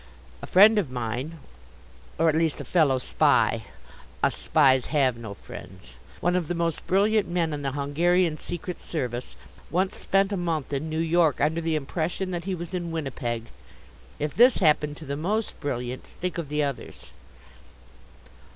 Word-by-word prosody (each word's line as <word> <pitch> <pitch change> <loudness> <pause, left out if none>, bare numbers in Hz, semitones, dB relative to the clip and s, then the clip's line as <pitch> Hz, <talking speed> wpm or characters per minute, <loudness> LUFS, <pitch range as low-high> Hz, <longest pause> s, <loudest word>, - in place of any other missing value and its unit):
A - - -7
friend 210 +3 +7
of 170 -10 -2
mine, 125 +6 -4 0.8
or 165 - +3
at 160 - +4
least 160 -1 +1
a - - -6
Fellow 150 -7 +3
Spy 125 - +2 0.6
us - - +3
Spies 130 -5 +3
have 135 -5 +2
no 110 -3 -8
friends 90 -9 -11 0.3
one 175 +1 +2
of 180 -4 0
the 175 - -2
most 170 -2 -2
brilliant 205 +3 +3
men 170 -3 0
in 145 - -4
the 135 -2 -2
Hungarian 160 +3 +1
Secret 180 +1 -5
Service, 125 -6 -4 0.3
once 185 +3 0
spent 195 +1 +1
a - - -1
month 165 -5 -2
in 145 +3 -2
New 155 - -3
York 165 -2 +2
under 160 +3 +1
the 165 -1 0
impression 165 +5 -2
that 175 -1 -4
he 190 -1 -1
was 170 +1 -7
in 175 -2 -3
Winnipeg. 125 -7 -4 0.7
If 150 0 -2
this 245 +2 +6
happened 150 -3 +2
to 160 - -10
the 140 - -3
most 205 +9 -2
brilliant, 125 -2 -4
think 180 0 -5
of 155 -4 -5
the 150 0 0
others. 140 -3 -6
160 Hz, 170 wpm, -26 LUFS, 140-175 Hz, 0.8 s, friend